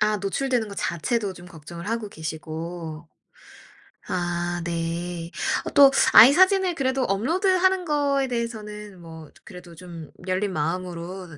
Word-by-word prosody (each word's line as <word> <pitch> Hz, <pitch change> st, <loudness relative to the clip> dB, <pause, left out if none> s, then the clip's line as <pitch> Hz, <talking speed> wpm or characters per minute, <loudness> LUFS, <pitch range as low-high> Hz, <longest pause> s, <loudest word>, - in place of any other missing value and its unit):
아 210 Hz, 0 st, +2 dB
노출되는 230 Hz, +3 st, -1 dB
거 200 Hz, -, -8 dB
자체도 200 Hz, +4 st, -2 dB
좀 175 Hz, 0 st, -13 dB
걱정을 170 Hz, +2 st, -10 dB
하고 230 Hz, -2 st, -3 dB
계시고. 160 Hz, 0 st, -7 dB, 1.0 s
아 175 Hz, -1 st, -2 dB
네. 170 Hz, +1 st, -4 dB, 0.3 s
어 -, -, -3 dB
또 275 Hz, -1 st, +7 dB, 0.2 s
아이 235 Hz, +5 st, +10 dB
사진을 375 Hz, 0 st, +4 dB
그래도 260 Hz, -2 st, 0 dB
업로드하는 365 Hz, -, +1 dB
거에 285 Hz, -3 st, +1 dB
대해서는 210 Hz, -5 st, -5 dB
뭐 160 Hz, -2 st, -11 dB
조 -, -, -24 dB
그래도 180 Hz, -3 st, -12 dB
좀 170 Hz, -3 st, -10 dB, 0.2 s
열린 190 Hz, +1 st, -1 dB
마음으로 175 Hz, +1 st, -4 dB
185 Hz, 280 characters per minute, -24 LUFS, 170-245 Hz, 1.0 s, 아이